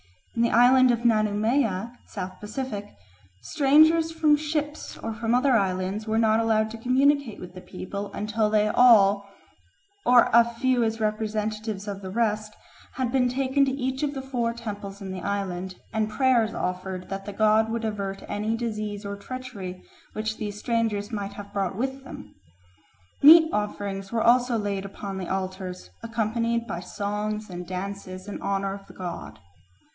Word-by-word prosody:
In 230 - +1
the 235 - +3
island 255 +2 +6
of 240 0 0
Nanumea 215 0 +1 0.2
(South 185 0 -6
Pacific) 210 -1 -5 0.5
strangers 315 +3 +4
from 315 -2 +4
ships 300 0 -3
or 225 - -4
from 230 +1 0
other 265 +2 +3
islands 195 -1 0
were 220 0 +1
not 220 -1 +3
allowed 220 -1 +1
to 230 - -7
communicate 265 0 +2
with 180 0 -9
the 185 - -10
people 200 +2 -6
until 215 +1 0
they 210 0 +3
all, 205 -4 +5 0.7
or 245 -1 +5
a 235 0 +8
few 240 +1 0
as 225 0 -1
representatives 215 -1 -2
of 200 -1 -5
the 190 - -6
rest, 215 0 -1 0.4
had 255 -2 -2
been 250 -1 +2
taken 265 +2 +1
to 270 - 0
each 265 0 -2
of 290 -1 -1
the 270 - -3
four 240 -3 -1
temples 205 -3 -7
in 190 -1 -6
the 185 -1 -5
island, 190 -2 -3 0.2
and 215 -1 0
prayers 240 -2 +2
offered 185 0 -4
that 195 0 -5
the 205 - -6
god 215 +1 +3
would 230 0 -2
avert 200 -2 -4
any 215 +2 -1
disease 215 -3 -4
or 200 0 -4
treachery 200 -5 -7 0.3
which 220 0 -3
these 210 -1 -5
strangers 220 -2 -1
might 205 -2 -4
have 205 -1 -10
brought 195 -2 -1
with 265 +4 -3
them. 105 - -10 0.9
Meat 320 +2 +8
offerings 200 -2 -3
were 230 -1 0
also 245 0 +4
laid 200 -2 -2
upon 195 0 -6
the 185 - -5
altars, 185 - -4
accompanied 230 +1 -1
by 185 -6 -4
songs 210 +3 -4
and 175 0 -7
dances 185 0 -6
in 205 - -6
honour 195 0 -1
of 195 0 -10
the - - -14
god. 180 -2 -6
215 Hz, 165 wpm, -26 LUFS, 200-240 Hz, 0.9 s, a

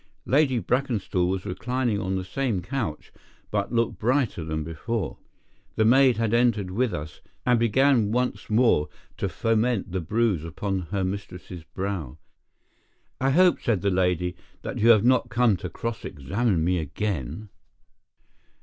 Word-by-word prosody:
Lady 135 0 +3
Brackenstall 115 -5 0
was 95 0 -2
reclining 120 +3 -1
on 95 -1 -2
the 95 - -2
same 115 -5 -2
couch, 110 - -4 0.4
but 100 -1 -1
looked 115 -1 0
brighter 125 - +1
than 80 -1 -3
before. 95 +8 -4 0.6
The 110 - +2
maid 130 +1 +5
had 115 -1 0
entered 115 -6 +2
with 120 +4 0
us, 75 0 -6 0.2
and 125 -2 +4
began 115 -1 +3
once 125 +1 -1
more 110 -9 +3 0.3
to - - -1
foment 115 -3 0
the 95 0 -2
bruise 105 -2 0
upon 90 +3 -3
her 100 -1 -1
mistress's 90 -2 -6
brow. 95 -8 -5 1.0
"I 135 - +2
hope," 180 +5 +4
said 110 -6 0
the 100 -1 +1
lady, 90 -1 +1 0.3
"that - - -4
you 115 - +4
have 110 -3 +7
not 125 -1 +3
come 120 -3 +3
to 90 - -6
cross 110 +5 -5
examine 95 - -1
me 90 +1 +1
again?" 80 - -4
105 Hz, 150 wpm, -25 LUFS, 90-120 Hz, 1.0 s, have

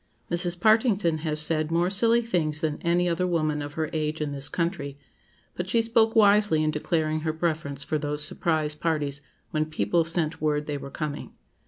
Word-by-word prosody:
Mrs. 175 0 -1
Partington 210 -6 +3
has 155 -1 -1
said 155 0 0
more 170 +2 +1
silly 230 +4 +4
things 160 -8 -1
than 155 -3 -1
any 175 +1 +2
other 175 +1 0
woman 155 -4 0
of 145 0 -6
her 160 0 -2
age 155 0 -1
in 150 -1 -2
this 140 0 -2
country; 165 -5 -2 0.6
but 180 +1 -4
she 230 +3 +3
spoke 225 0 +3
wisely 205 -6 +5
in 155 - +1
declaring 155 0 -1
her 155 0 -1
preference 155 -4 -2
for 155 +2 -1
those 150 0 -2
surprise 155 -3 0
parties 150 -3 -2 0.3
"when 155 0 0
people 155 +2 +1
sent 160 -1 -1
word 150 -1 0
they 145 -1 -3
were 140 - -8
coming." 150 0 -5
160 Hz, 185 wpm, -26 LUFS, 150-175 Hz, 0.6 s, wisely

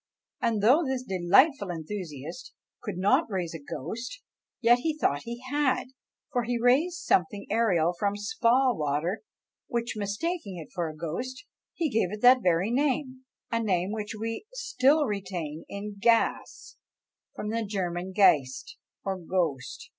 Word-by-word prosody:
And 225 -4 +1
though 265 +10 +6
this 265 -3 -2
delightful 200 - +3
enthusiast 165 - -6 0.3
could 205 -4 -5
not 240 - +3
raise 180 -5 -2
a 165 - -6
ghost, 215 - -6 0.4
yet 240 0 +5
he 310 +3 -1
thought 145 - +1
he 235 +1 -6
had; 285 -3 +1 0.4
for 250 -3 +1
he 240 +1 -1
raised 270 +9 +3
something 195 +3 +1
aerial 185 -7 +2
from 200 +3 -1
spa 245 +3 +2
water, 150 +4 -1 0.5
which 235 0 -2
mistaking 205 - -3
for 175 -3 -2
a 155 - -9
ghost, 175 +12 -5 0.3
he 330 - 0
gave 220 -8 0
it 210 0 -6
that 250 +1 +7
very 180 +3 +2
name; 260 -1 0 0.3
a 230 0 +1
name 190 -3 0
which 215 0 -4
we 225 - -4
still 310 - +2
retain 185 - -4
in 200 0 -6
gas, 230 +1 +1 0.6
from 210 - -4
the 230 0 -1
German 185 -3 -3
geist, 150 -10 +3 0.3
or 190 -1 -2
ghost! 165 -7 -2
210 Hz, 145 wpm, -28 LUFS, 180-255 Hz, 0.6 s, that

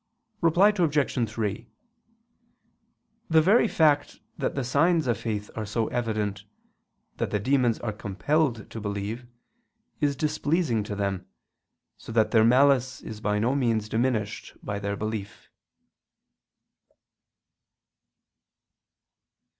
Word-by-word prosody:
Reply 175 +5 +5
Obj. 150 - +1
3: 105 -3 -3 1.6
The 160 -1 +5
very 220 +6 +5
fact 150 -6 +2 0.2
that - - -2
the 135 - -1
signs 160 +6 +2
of 120 -2 +1
faith 105 -2 -4
are 110 - -3
so 110 +2 -2
evident, 105 -4 -2 0.7
that - - -1
the 105 - -1
demons 125 0 +2
are 110 -3 -3
compelled 115 +4 -1
to 115 - -6
believe, 105 +4 -4 0.7
is 145 -2 +1
displeasing 150 -4 0
to 105 - -4
them, 100 -2 -2 0.7
so - - -10
that 110 -1 +2
their 110 -1 +5
malice 130 +1 +3
is 110 -1 -8
by 105 -1 0
no 115 +5 +1
means 115 -6 0
diminished 110 -2 -2
by 100 0 -3
their 100 0 -2
belief. 110 -1 -6
115 Hz, 115 wpm, -26 LUFS, 105-140 Hz, 1.6 s, Reply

